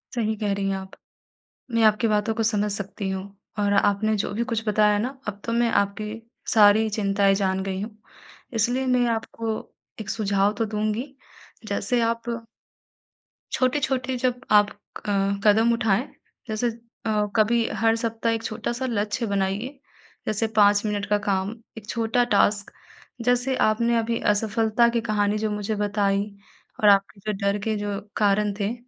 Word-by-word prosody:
सही 220 -2 0
कह 205 -1 -1
रही 195 0 -1
हैं 195 - 0
आप। 190 0 -9 0.8
मैं 230 - +3
आपकी 215 +1 +4
बातों 210 +1 +1
को 225 - -1
समझ 210 -1 +1
सकती 200 0 -5
हूँ 190 0 -3 0.3
और 205 -1 +2
आपने 205 +2 +2
जो 200 - -2
भी 235 +3 0
कुछ 225 0 -2
बताया 210 0 +3
ना, 255 +5 -3
अब 205 -1 -5
तो 230 - -2
मैं 235 0 +2
आपकी 210 +2 -1 0.3
सारी 215 0 +6
चिंताएँ 200 -1 +2
जान 190 -1 0
गई 190 -1 -3
हूँ। 215 0 -7 0.6
इसलिए 245 +4 +1
मैं 250 -1 +3
आपको 225 0 -4 0.4
एक 215 - -5
सुझाव 200 -1 +1
तो 225 - +2
दूँगी, 215 +5 -2 0.5
जैसे 245 -1 0
आप 230 0 0 1.3
छोटे-छोटे 260 0 0
जब 250 0 -1
आप 205 -1 +6
अ, 205 0 -8 0.3
कदम 220 +3 +5
उठाएँ 230 +1 +1 0.4
जैसे 220 +2 -1
अ, 225 -2 -3
कभी 230 +1 +3
हर 225 0 +3
सप्ताह 230 0 -1
एक 225 0 -3
छोटा-सा 235 +3 -3
लक्ष्य 210 +1 -1
बनाइए। 200 +7 -2 0.5
जैसे 215 +1 0
5 205 0 +5
मिनट 205 -1 -1
का 210 - +3
काम, 195 0 0 0.3
एक 210 -2 -10
छोटा 230 +1 +1
टास्क 200 0 +2 0.5
जैसे 245 +1 +2
आपने 235 +2 +2
अभी 230 0 0
असफलता 220 +2 +2
की 235 0 0
कहानी 210 -2 0
जो 215 0 -1
मुझे 210 +1 -2
बताई 205 -1 +1 0.6
और 210 - +8
आपके 200 +1 +3
जो 215 - 0
डर 200 +1 +2
के 220 0 0
जो 205 -1 -3 0.2
कारण 205 0 +2
थे, 205 +2 0
215 Hz, 160 wpm, -24 LUFS, 205-230 Hz, 1.3 s, और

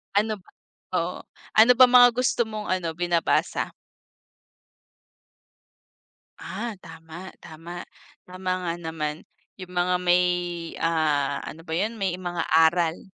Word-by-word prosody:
Ano 215 +1 +1
ba 185 - -22 0.4
oo, 180 0 -1 0.4
ano 225 +3 +8
ba 255 +1 +8
mga 245 0 +8
gusto 255 -3 +1
mong 215 -1 -6
ano, 180 -3 -1
binabasa? 175 0 0 2.7
Ah, 235 -1 -5
tama, 165 +2 -11
tama. 170 +2 -9 0.4
Tama 185 0 -4
nga 170 - 0
naman, 160 -1 -4 0.4
'yong 185 -2 -9
mga 180 0 +1
may, 180 0 +4 0.6
ah, 155 -4 +1
ano 160 - -9
ba 160 -1 -7
'yon, 215 +5 -1
may 185 -2 0
mga 175 -2 -3
aral. 165 +1 +3
175 Hz, 120 wpm, -25 LUFS, 165-190 Hz, 2.7 s, ano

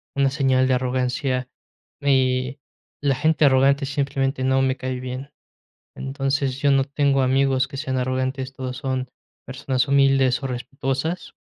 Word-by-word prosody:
una 140 -1 +2
señal 130 -2 +2
de 130 - +2
arrogancia, 125 +1 -1 0.5
y 130 -1 +1 0.4
la 140 -1 +3
gente 155 +3 +2
arrogante 140 +1 +4
simplemente 135 -1 -1
no 130 0 +2
me 130 0 +1
cae 130 -1 -4
bien. 130 +3 -6 0.6
Entonces, 135 0 -2
yo 145 - +3
no 135 -1 +4
tengo 140 -1 +1
amigos 130 0 +2
que 135 - -8
sean 135 -2 -2
arrogantes, 130 +1 -2
todos 130 -1 -5
son 130 -2 -3 0.4
personas 130 -1 -1
humildes 135 -2 +3
o - - -1
respetuosas, 135 +6 -3
135 Hz, 140 wpm, -23 LUFS, 130-140 Hz, 0.6 s, arrogante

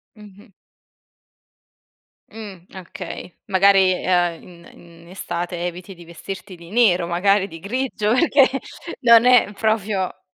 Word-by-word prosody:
Mh-mh. 210 +1 -16 1.8
Mh, 200 -5 -11
okay, 180 -1 -9
magari, 195 -1 +4
uhm, 175 -2 0
in 170 -1 -16
in 170 0 -18
estate 175 -1 -5
eviti 180 +2 -7
di 170 - -15
vestirti 190 +3 -9
di 170 -1 -15
nero, 190 -6 +2
magari 195 +3 +1
di 165 - -11
grigio, 220 +1 -2
perché 275 0 +4 0.5
non 235 -1 +5
è 245 -4 +4
proprio 210 -3 -2
190 Hz, 115 wpm, -20 LUFS, 175-215 Hz, 1.8 s, non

